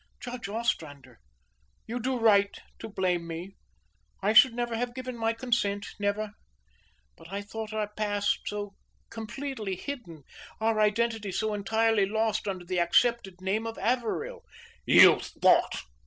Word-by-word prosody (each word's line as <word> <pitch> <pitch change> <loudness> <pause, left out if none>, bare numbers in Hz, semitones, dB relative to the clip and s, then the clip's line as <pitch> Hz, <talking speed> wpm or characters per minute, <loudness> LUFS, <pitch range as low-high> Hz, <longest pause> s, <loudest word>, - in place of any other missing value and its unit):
"Judge 245 -4 -6
Ostrander, 145 - -3 0.7
you 240 +2 -4
do 255 +2 -1
right 205 -3 +4 0.2
to 225 - -7
blame 180 -4 -1
me. 170 +3 -6 0.7
I 205 +2 +1
should 230 +2 +7
never 240 -1 -2
have 240 +1 -3
given 255 -1 -5
my 225 -1 0
consent, 225 -4 -1
never. 205 +1 -1 0.8
But 165 - -15
I 200 +1 -4
thought 220 +1 -6
our 215 -1 -1
past 205 -1 -1
so 205 -1 -4 0.4
completely 225 -2 -5
hidden 185 - -7 0.4
our 220 0 +1
identity 215 -1 +1
so 215 +3 -1
entirely 220 0 +2
lost 220 0 0
under 185 -3 -4
the 180 0 -1
accepted 190 +1 +2
name 210 +4 -1
of 225 - -6
Averill." 255 - -1 0.5
"You - - +8
thought!" - - +2
215 Hz, 140 wpm, -28 LUFS, 200-235 Hz, 0.8 s, You